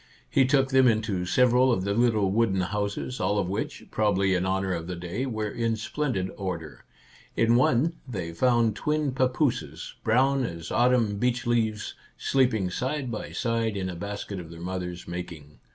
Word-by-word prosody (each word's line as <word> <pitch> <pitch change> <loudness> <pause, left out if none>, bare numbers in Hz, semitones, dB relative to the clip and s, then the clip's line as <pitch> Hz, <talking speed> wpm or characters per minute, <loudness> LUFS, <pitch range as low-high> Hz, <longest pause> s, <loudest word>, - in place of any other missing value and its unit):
He 135 - +4
took 135 -1 +3
them 130 -1 +5
into 110 -5 0
several 125 +4 +4
of 95 -6 +1
the 100 +1 0
little 110 -4 +2
wooden 100 -3 +2
houses, 100 +6 -3
all 105 - +1
of 100 -3 0
which, 95 - -4
probably 100 -3 +2
in 90 0 0
honour 95 0 0
of 85 -1 -4
the 90 - -4
day, 90 +10 -4
were 110 -4 -3
in 115 0 0
splendid 110 -4 -2
order. 85 -6 -5 0.5
In 115 +1 +3
one 125 +6 +3
they 90 -9 -4
found 120 +1 +2
twin 150 +3 0
papooses, 130 +1 -1
brown 130 +4 +3
as 85 -7 -5
autumn 120 -4 +2
beech 125 0 0
leaves, 110 -3 0 0.2
sleeping 120 -9 +1
side 130 +4 -2
by 110 - -5
side 115 -3 -1
in 95 -1 -2
a - - -7
basket 100 +1 -5
of 85 -2 -9
their 85 0 -10
mother's 90 0 -5
making. 85 -4 -7
110 Hz, 170 wpm, -27 LUFS, 95-125 Hz, 0.5 s, them